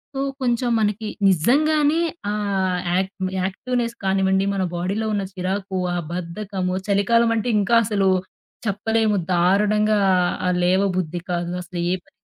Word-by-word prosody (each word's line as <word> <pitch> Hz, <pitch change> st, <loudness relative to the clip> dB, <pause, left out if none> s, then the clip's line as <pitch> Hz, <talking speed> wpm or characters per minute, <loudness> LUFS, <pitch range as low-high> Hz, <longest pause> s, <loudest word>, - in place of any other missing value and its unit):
so, -, -, -2 dB, 0.2 s
కొంచెం 245 Hz, -1 st, +1 dB
మనకి 210 Hz, +1 st, -1 dB, 0.2 s
నిజంగానే 295 Hz, -, +3 dB, 0.3 s
ఆ -, -, -1 dB, 0.6 s
యాక్ 190 Hz, +1 st, 0 dB, 0.3 s
యాక్టివ్‌నెస్ 235 Hz, +4 st, -2 dB
కానివ్వండి, 190 Hz, 0 st, +2 dB
మన 195 Hz, -, 0 dB
బాడీలో 195 Hz, +6 st, -2 dB
ఉన్న 200 Hz, -1 st, 0 dB
చిరాకు, 190 Hz, +1 st, -3 dB, 0.2 s
ఆ -, -, -1 dB
బద్ధకము, 180 Hz, +1 st, -3 dB
చలికాలమంటే 230 Hz, +3 st, +2 dB
ఇంకా 205 Hz, +4 st, +2 dB
అసలు 200 Hz, -2 st, +1 dB, 0.6 s
చెప్పలేము 215 Hz, +1 st, +1 dB, 0.2 s
దారుణంగా 210 Hz, +4 st, +3 dB, 0.5 s
ఆహ్, 180 Hz, 0 st, +1 dB
లేవ 185 Hz, +2 st, +3 dB
బుద్ధి 175 Hz, -1 st, -2 dB
కాదు 175 Hz, 0 st, -2 dB
అసలు 175 Hz, 0 st, -7 dB
ఏ -, -, +2 dB
పనీ -, -, -27 dB
200 Hz, 125 wpm, -22 LUFS, 185-225 Hz, 0.6 s, నిజంగానే